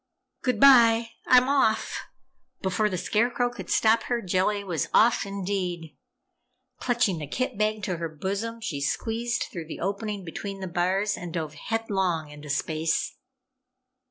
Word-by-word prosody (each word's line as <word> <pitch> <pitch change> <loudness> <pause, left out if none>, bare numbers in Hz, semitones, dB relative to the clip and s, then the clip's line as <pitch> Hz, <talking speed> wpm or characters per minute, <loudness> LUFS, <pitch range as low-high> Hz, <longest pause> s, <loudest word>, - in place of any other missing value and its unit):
"Goodbye! 235 -2 +5 0.2
I'm 255 0 +6
off!" 265 -6 +1 0.6
Before 195 +3 +1
the 185 - -2
Scarecrow 240 +6 +1
could 240 - -9
stop 220 +1 +4
her, 240 -1 0
Jellia 195 +1 0
was 175 -5 -1
off, 230 -2 +4
indeed! 185 -4 -3 0.8
Clutching 235 -8 +1
the 150 - -5
kit 255 - -2
bag 215 0 0
to 185 -3 -2
her 165 0 -3
bosom, 200 +9 -4
she 155 -11 -3
squeezed 230 +10 -1
through 165 -3 -6
the 160 - -7
opening 200 +1 -3
between 195 +4 -6
the 190 - -4
bars 185 +4 0
and 175 -1 -7
dove 155 -3 -3
headlong 190 -4 -1
into 150 0 -11
space! 160 +3 -1
200 Hz, 140 wpm, -26 LUFS, 175-230 Hz, 0.8 s, I'm